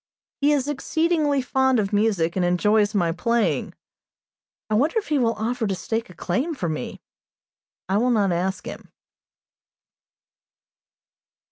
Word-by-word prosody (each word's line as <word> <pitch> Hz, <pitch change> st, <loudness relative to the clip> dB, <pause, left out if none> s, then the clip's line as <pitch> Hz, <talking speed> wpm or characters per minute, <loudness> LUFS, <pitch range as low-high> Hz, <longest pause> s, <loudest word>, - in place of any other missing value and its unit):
He 285 Hz, +1 st, +3 dB
is 285 Hz, -2 st, +1 dB
exceedingly 295 Hz, -1 st, 0 dB
fond 265 Hz, 0 st, +2 dB
of 200 Hz, -1 st, -2 dB
music, 200 Hz, -6 st, +1 dB
and 185 Hz, -, +1 dB
enjoys 210 Hz, +4 st, +2 dB
my 170 Hz, -4 st, +2 dB
playing. 230 Hz, +6 st, 0 dB, 0.9 s
I 215 Hz, -, -3 dB
wonder 290 Hz, -, +2 dB
if 430 Hz, -, -2 dB
he 300 Hz, -2 st, +2 dB
will 230 Hz, -2 st, +1 dB
offer 225 Hz, +1 st, -2 dB
to 195 Hz, -, -1 dB
stake 225 Hz, +4 st, -3 dB
a 180 Hz, -, -13 dB
claim 270 Hz, -, -2 dB
for 180 Hz, -, -3 dB
me! 155 Hz, -6 st, -4 dB, 0.9 s
I 190 Hz, +2 st, +1 dB
will 245 Hz, +4 st, +2 dB
not 205 Hz, -5 st, +2 dB
ask 185 Hz, +3 st, -2 dB
him. -, -, -8 dB
220 Hz, 140 wpm, -23 LUFS, 190-265 Hz, 0.9 s, He